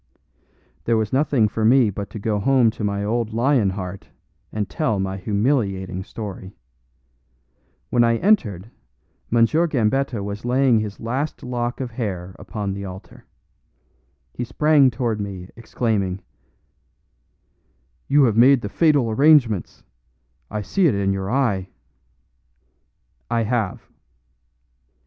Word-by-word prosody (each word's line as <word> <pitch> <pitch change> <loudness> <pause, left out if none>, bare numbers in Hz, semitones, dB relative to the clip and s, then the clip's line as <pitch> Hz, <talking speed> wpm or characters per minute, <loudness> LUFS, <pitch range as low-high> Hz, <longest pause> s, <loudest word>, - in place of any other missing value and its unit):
There 115 -1 +2
was 110 +1 -2
nothing 135 -5 +2
for 110 +2 -3
me 120 -1 +4
but 100 +1 -6
to - - -8
go 105 0 -1
home 125 0 +3
to 110 - -7
my 100 0 -1
old 110 +1 -1
lion 120 -3 +2
heart 95 0 -6 0.4
and 105 -2 -2
tell 110 - -1
my 95 0 -2
humiliating 100 -3 -1
story. 100 -2 -8 1.4
When 120 -1 +4
I 115 0 +3
entered, 115 - +1 0.6
M. 115 0 +5
Gambetta 135 -6 0
was 100 +2 -6
laying 125 -1 +3
his 105 -1 -5
last 130 +7 -3
lock 120 -1 -3
of 130 -2 -4
hair 95 -6 -5
upon 100 -3 -4
the 100 0 -6
altar. 95 0 -10 1.1
He 120 - -4
sprang 150 +2 +3
toward 115 -3 -2
me, 95 -2 -7
exclaiming: 105 -5 -2 1.9
"You 145 +1 +4
have 115 -5 +2
made 130 +3 +6
the 105 - -5
fatal 145 -4 +2
arrangements 130 - +3 0.7
I 105 0 -4
see 190 - +2
it 130 - +1
in 100 -1 0
your 95 0 -3
eye!" 115 -8 0 1.6
"I 115 -1 +1
have." 110 -4 -2
110 Hz, 125 wpm, -22 LUFS, 100-130 Hz, 1.9 s, made